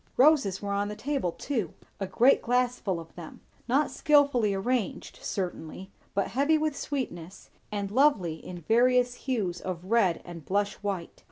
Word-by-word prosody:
Roses 255 - +4
were 200 - -2
on 200 +1 0
the 210 - -5
table 270 -8 -1
too; 220 - -3 0.2
a 195 - -2
great 250 +8 +4
glass 250 +1 +1
full 190 -4 -2
of 165 -1 -11
them; 170 -3 -10 0.3
not 275 +5 +2
skilfully 280 -8 +3
arranged, 210 +2 -2
certainly, 185 0 -5 0.2
but 200 - +1
heavy 285 +5 +2
with 305 -1 -1
sweetness 195 - -5 0.2
and 200 -1 -3
lovely 210 - +2
in 180 - -7
various 245 +6 +3
hues 210 -10 -2
of 180 -1 -5
red 195 -8 +3
and 170 -2 -9
blush 200 +5 0
white. 195 -5 -4
205 Hz, 160 wpm, -28 LUFS, 185-255 Hz, 0.3 s, Roses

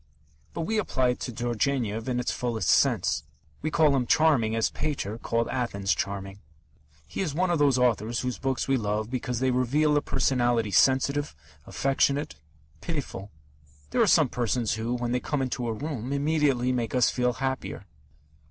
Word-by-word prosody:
But - - -2
we 215 +6 0
apply 130 -11 +1
it 125 - -1
to 125 - -4
Turgenev 120 -1 -1
in 125 -1 0
its 125 - -1
fullest 115 -8 -2
sense. - - +3 0.4
We 155 - -1
call 155 -3 +3
him 125 -3 0
charming 135 -9 +3
as 115 - +1
Pater 115 -8 -3
called 115 0 -1
Athens 100 -6 -1
charming. 100 0 -4 0.7
He - - -4
is 155 -7 -2
one 180 +2 +1
of 170 - +1
those 140 -3 +4
authors 120 -2 +1
whose 125 -1 -3
books 135 -1 -1
we 135 -1 +2
love 105 0 -2
because 125 -2 -2
they 130 -1 +2
reveal 140 +5 +2
a 145 - +3
personality 120 -6 +1
sensitive, 135 - +2 0.3
affectionate, 140 +2 0 0.5
pitiful. 140 - -5 0.6
There - - +2
are - - +4
some - - +4
persons 120 -2 -1
who, 115 +3 -2
when 120 -1 -2
they 125 - +1
come 145 +3 -2
into 125 -2 -2
a 115 - -1
room, 135 -1 -5
immediately 140 -3 +1
make 120 -2 -2
us 125 - +4
feel 125 -1 0
happier. 130 -5 -4
125 Hz, 170 wpm, -27 LUFS, 115-140 Hz, 0.7 s, those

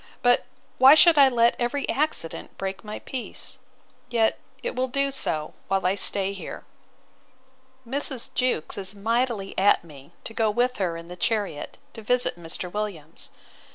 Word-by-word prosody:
—But 245 0 +4 0.3
why 265 +3 +9
should 320 -1 +7
I 275 -1 +8
let 235 -1 +3
every 250 +4 -1
accident 290 - -1
break 195 0 -4
my 210 0 -6
peace? 255 -3 -6 0.5
Yet 225 -2 +2 0.2
it 485 - -3
will 255 +1 0
do 275 +2 0
so, 155 - -2
while 195 -1 0
I 185 - +3
stay 195 0 +2
here. 195 - -8 1.2
Mrs. 270 -1 -3
Jewkes 250 -9 0
is 195 +1 -3
mightily 225 -1 -1
at 195 -2 +4
me, 145 -2 -14
to 225 - -6
go 220 -1 +2
with 245 +4 +1
her 175 -4 -1
in 165 0 -10
the 180 - -8
chariot, 200 -5 -2 0.2
to 225 - -9
visit 245 +3 +1
Mr. 175 +1 -6
Williams. 190 -7 -5
215 Hz, 155 wpm, -25 LUFS, 190-250 Hz, 1.2 s, why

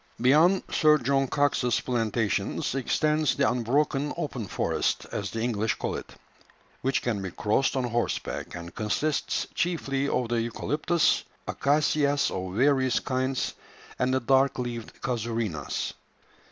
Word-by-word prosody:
Beyond 155 +10 +5
Sir 155 -1 +5
John 135 0 +1
Cox's 135 -4 +1
plantations 115 -4 -1
extends 150 +3 +1
the 140 -1 +2
unbroken 135 +4 +1
"open 125 -8 -3
forest," - - -1
as 100 -1 -3
the 115 - -4
English 110 -2 0
call - - -3
it, - - -8 0.7
which 135 +1 0
can 110 -5 -1
be 95 - -4
crossed 110 +10 +1
on 130 - +1
horseback, 120 -1 -2
and 85 0 -8
consists 125 +8 -1
chiefly 140 -6 -1
of 125 -2 0
the 120 -1 +1
eucalyptus, 150 +8 +1 0.2
acacias 145 0 +2
of 95 0 -4
various 130 0 +3
kinds, 130 0 -1 0.5
and 125 0 +2
the 130 - +2
dark 135 +2 +3
leaved 120 -2 -5
casuarinas. 115 - -2
130 Hz, 130 wpm, -27 LUFS, 115-140 Hz, 0.7 s, Beyond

